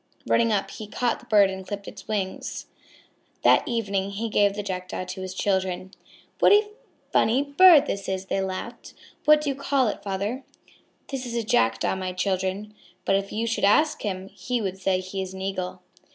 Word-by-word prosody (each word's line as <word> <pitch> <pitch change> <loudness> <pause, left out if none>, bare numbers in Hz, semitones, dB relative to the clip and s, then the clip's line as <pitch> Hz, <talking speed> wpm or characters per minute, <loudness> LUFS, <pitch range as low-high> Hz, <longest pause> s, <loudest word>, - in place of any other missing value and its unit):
Running 230 -1 +3
up, 195 -2 0
he 215 - -8
caught 240 +3 -1
the - - -18
bird 205 -3 +5
and 190 0 -6
clipped 200 +1 -6
its - - -10
wings. 200 -3 -3 0.8
That - - +6
evening 200 -5 -1
he 215 +3 -3
gave 205 -2 +3
the 205 - -3
Jackdaw 185 -1 -4
to 185 +1 -7
his 185 0 -6
children. 190 -1 -1 0.5
"What - - +6
a 415 0 +5 0.4
funny 250 +5 +3
bird 300 +1 +7
this 200 -8 -4
is!" 190 0 -2
they 190 - -2
said 190 - 0
laughing, 190 +6 -7 0.3
"what 300 0 +6
do 300 - -1
you 275 - -1
call 275 -3 +1
it, - - -5
father?" 205 +7 -3 0.7
"That 270 -2 -4
is 240 -2 -5
a 235 - 0
Jackdaw, 115 - +1
my 185 -1 -3
children. 190 +2 -2 0.3
But 195 - +3
if 195 0 -1
you 225 +2 -1
should 230 0 -2
ask 300 +10 +4
him, 190 -2 -4
he 250 +3 -3
would 190 -3 -3
say 185 0 +1
he 185 +1 -5
is 190 0 -6
an 190 - -7
Eagle." 185 -2 -4
200 Hz, 195 wpm, -25 LUFS, 190-235 Hz, 0.8 s, bird